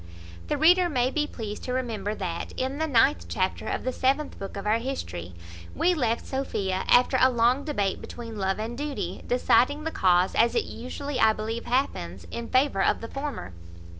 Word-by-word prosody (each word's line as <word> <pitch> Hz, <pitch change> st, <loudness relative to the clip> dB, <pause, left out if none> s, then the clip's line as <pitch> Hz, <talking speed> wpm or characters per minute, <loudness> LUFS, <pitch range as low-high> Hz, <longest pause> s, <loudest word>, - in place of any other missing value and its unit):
The 295 Hz, -, 0 dB
reader 350 Hz, +4 st, +5 dB
may 255 Hz, -3 st, +1 dB
be 300 Hz, 0 st, 0 dB
pleased 215 Hz, -6 st, -6 dB
to 250 Hz, -, -2 dB
remember 220 Hz, -5 st, -2 dB
that, 175 Hz, -4 st, -4 dB
in 265 Hz, +3 st, -2 dB
the 320 Hz, -, 0 dB
ninth 275 Hz, +1 st, +3 dB
chapter 185 Hz, -1 st, -1 dB
of -, -, -2 dB
the 255 Hz, -, -1 dB
seventh 275 Hz, +4 st, 0 dB
book 195 Hz, 0 st, -6 dB
of 200 Hz, -, -5 dB
our 215 Hz, +2 st, +2 dB
history, 90 Hz, -, -5 dB, 0.4 s
we 360 Hz, -, +3 dB
left 235 Hz, -8 st, 0 dB
Sophia, 200 Hz, -8 st, -2 dB
after 250 Hz, +1 st, +5 dB
a 260 Hz, -, +7 dB
long 245 Hz, +3 st, +2 dB
debate 205 Hz, -11 st, -1 dB
between 230 Hz, -2 st, -8 dB
love 190 Hz, 0 st, 0 dB
and 225 Hz, +2 st, -4 dB
duty, 245 Hz, -11 st, -4 dB
deciding 250 Hz, +4 st, +3 dB
the 320 Hz, -, -2 dB
cause, 180 Hz, -, +3 dB
as 235 Hz, +1 st, +3 dB
it -, -, +2 dB
usually, 270 Hz, +3 st, -5 dB
I 220 Hz, 0 st, +5 dB
believe, 225 Hz, +2 st, -4 dB
happens, 95 Hz, -, -1 dB
in 235 Hz, 0 st, -5 dB
favour 255 Hz, -6 st, +2 dB
of -, -, +2 dB
the 230 Hz, -, -6 dB
former. 275 Hz, -, -5 dB
240 Hz, 190 wpm, -26 LUFS, 205-275 Hz, 0.4 s, a